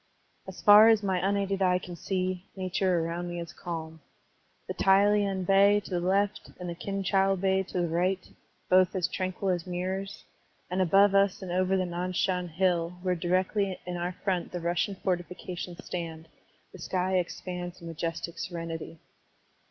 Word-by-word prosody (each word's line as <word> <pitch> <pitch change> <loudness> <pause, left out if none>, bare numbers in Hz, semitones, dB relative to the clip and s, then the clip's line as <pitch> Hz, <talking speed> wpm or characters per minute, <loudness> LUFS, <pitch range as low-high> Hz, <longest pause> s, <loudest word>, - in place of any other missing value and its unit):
As - - -9
far 210 +1 +9
as 220 -2 +4
my 190 -2 +1
imaided 195 +1 0
eye 180 -1 +4
can 180 -1 -8
see, 185 +1 -3
nature 185 -2 0
around 175 +1 -3
me 175 0 -4
is 170 0 -7
calm. 160 -2 -6 0.7
The - - -3
Tai 195 +1 +4
lien 200 -2 +1
Bay 200 +2 +5
to 205 - -12
the 175 - 0
left 200 +3 0
and 180 - -5
the 170 - -3
Kin 195 +3 -4
chou 195 0 +3
Bay 190 0 +1
to 185 -1 -3
the 175 - 0
right, 180 +3 0 0.4
both 185 +1 +4
as 185 -1 +1
tranquil 185 +1 -3
as 175 -1 -2
mirrors, 190 +2 -4 0.5
and 185 +1 +1
above 195 +3 +5
us 195 -1 +2
and 180 - -5
over 185 +1 +2
the 185 - 0
Nan 180 +1 -3
Shan 180 0 0
Hill, 175 0 0
where 185 -1 +1
directly 185 +3 0
in 180 0 -4
our 175 +1 -2
front 185 -4 -1
the 180 - -4
Russian 175 +3 -1
fortifications 180 -1 -4
stand, 165 -2 -5 0.5
the 190 - -11
sky 185 +2 0
expands 180 0 -5
in 170 - -11
majestic 165 +1 -4
serenity. 165 -2 -5
185 Hz, 175 wpm, -28 LUFS, 175-195 Hz, 0.7 s, far